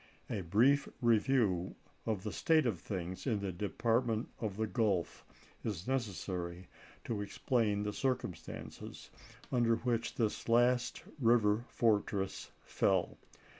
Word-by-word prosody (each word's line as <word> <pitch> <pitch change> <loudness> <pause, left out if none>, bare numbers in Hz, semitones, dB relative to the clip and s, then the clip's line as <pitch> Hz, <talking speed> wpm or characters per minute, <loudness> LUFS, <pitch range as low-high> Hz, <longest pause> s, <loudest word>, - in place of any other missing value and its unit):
A 100 - -1
brief 120 +11 +3
review 115 -6 +2 0.3
of 105 -4 -1
the 105 - -3
state 160 -3 +3
of 105 -8 0
things 95 +3 -5
in 110 -5 +1
the 100 -1 -2
Department 115 +4 0
of 105 -4 -3
the 110 - +1
Gulf 105 - 0 0.4
is 100 -3 -4
necessary 95 -8 -3 0.4
to 110 -3 -2
explain 105 0 0
the 105 0 -2
circumstances 125 -11 -4 0.4
under 120 -2 +3
which 115 0 -1
this 110 0 -1
last 120 +1 +3 0.2
river 115 -2 +3
fortress 100 -4 0
fell. - - +1
110 Hz, 120 wpm, -34 LUFS, 100-120 Hz, 0.4 s, brief